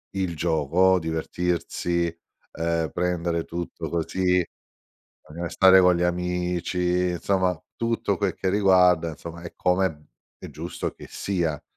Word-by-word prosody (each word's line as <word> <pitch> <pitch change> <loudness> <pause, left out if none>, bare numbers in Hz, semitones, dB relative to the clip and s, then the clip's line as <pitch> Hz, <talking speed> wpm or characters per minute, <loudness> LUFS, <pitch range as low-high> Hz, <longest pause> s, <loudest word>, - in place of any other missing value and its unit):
il 95 -3 -1
gioco, 85 +4 +2
divertirsi, 85 +1 -1 0.5
ehm, 80 -1 -1
prendere 85 -1 -1
tutto 85 -2 -5
così 90 +1 +1 0.8
bisogna 80 +3 -7
restare 95 +2 +6
con 90 0 +5
gli 85 - -1
amici, 90 0 0
insomma 90 -1 0 0.2
tutto 115 -4 0
quel 100 -2 -1
che 95 - -1
riguarda, 90 -4 +4
insomma 85 +2 -9
e 85 - -8
come, 95 +1 +2
mhmm, 75 -3 -14 0.3
è - - -9
giusto - - -5
che - - -13
sia. 85 -6 -2
90 Hz, 130 wpm, -25 LUFS, 85-90 Hz, 0.8 s, restare